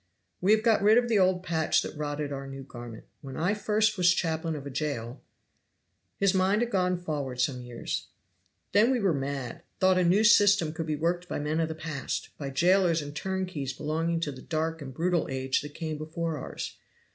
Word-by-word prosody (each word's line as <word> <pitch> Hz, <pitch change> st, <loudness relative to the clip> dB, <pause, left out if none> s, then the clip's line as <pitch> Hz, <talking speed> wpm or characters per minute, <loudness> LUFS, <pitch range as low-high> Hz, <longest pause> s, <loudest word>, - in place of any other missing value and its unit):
"We 190 Hz, +3 st, +3 dB
have 220 Hz, 0 st, +2 dB
got 225 Hz, -3 st, +4 dB
rid 210 Hz, +3 st, +6 dB
of 240 Hz, -1 st, +2 dB
the 220 Hz, -3 st, +3 dB
old 185 Hz, -1 st, +3 dB
patch 160 Hz, -3 st, +1 dB
that -, -, -6 dB
rotted 145 Hz, -1 st, -3 dB
our 135 Hz, 0 st, -5 dB
new 135 Hz, 0 st, -7 dB
garment. 120 Hz, -3 st, -9 dB, 0.2 s
When 135 Hz, -3 st, -8 dB
I 175 Hz, +6 st, +1 dB
first 215 Hz, 0 st, +1 dB
was 175 Hz, -1 st, +6 dB
chaplain 160 Hz, -1 st, -1 dB
of 145 Hz, -2 st, -7 dB
a 140 Hz, -, -6 dB
jail 130 Hz, -4 st, -3 dB, 0.5 s
" -, -, -48 dB
His 200 Hz, -1 st, +3 dB
mind 195 Hz, +4 st, +3 dB
had 240 Hz, -, -3 dB
gone 180 Hz, -2 st, +1 dB
forward 145 Hz, -7 st, -4 dB
some 125 Hz, 0 st, 0 dB
years. 120 Hz, -1 st, -5 dB, 0.6 s
"Then 210 Hz, +4 st, +5 dB
we 260 Hz, -2 st, +2 dB
were 195 Hz, -5 st, +2 dB
mad 135 Hz, +1 st, -4 dB, 0.2 s
thought 185 Hz, -1 st, +4 dB
a -, -, +3 dB
new 185 Hz, +5 st, +4 dB
system 205 Hz, -6 st, +5 dB
could 165 Hz, -1 st, -4 dB
be 155 Hz, -, 0 dB
worked 175 Hz, +3 st, -1 dB
by -, -, -2 dB
men 150 Hz, +2 st, -1 dB
of 165 Hz, -, +1 dB
the 160 Hz, -, -4 dB
past, 155 Hz, -3 st, -4 dB
by 140 Hz, -2 st, -4 dB
jailers 170 Hz, +3 st, +3 dB
and 145 Hz, 0 st, -8 dB
turnkeys 185 Hz, -8 st, -3 dB
belonging 160 Hz, +3 st, -1 dB
to 150 Hz, -, -1 dB
the 130 Hz, -1 st, -10 dB
dark 160 Hz, 0 st, -2 dB
and 135 Hz, -2 st, -6 dB
brutal 170 Hz, +4 st, 0 dB
age 130 Hz, 0 st, 0 dB
that 145 Hz, 0 st, -9 dB
came 155 Hz, -2 st, -4 dB
before 160 Hz, 0 st, -3 dB
ours. -, -, -6 dB
160 Hz, 210 wpm, -28 LUFS, 145-185 Hz, 0.6 s, rid